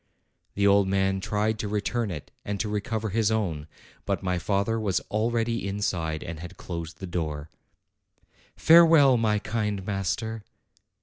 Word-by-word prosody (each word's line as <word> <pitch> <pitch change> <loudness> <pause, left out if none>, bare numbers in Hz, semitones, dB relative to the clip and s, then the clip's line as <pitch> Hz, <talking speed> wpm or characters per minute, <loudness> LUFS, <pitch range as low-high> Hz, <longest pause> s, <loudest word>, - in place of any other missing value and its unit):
The 100 - +1
old 100 -1 +5
man 95 0 +1
tried 105 +2 -1
to 105 - -2
return 105 +2 -1
it 75 -6 -7
and 100 -1 -4
to 105 - -1
recover 105 +1 -2
his 110 +1 +1
own; 90 -9 -1 0.4
but - - -1
my 90 -1 0
father 100 +5 0
was 100 -4 0
already 115 0 0
inside 85 -6 -2
and 85 -1 -6
had 85 +2 -9
closed 85 -2 -6
the 95 - -6
door. 80 -4 -4 1.0
"Farewell, 160 -6 +7
my 110 -2 +2
kind 105 -2 -2
master!" 105 +3 -2
100 Hz, 145 wpm, -26 LUFS, 90-110 Hz, 1.0 s, Farewell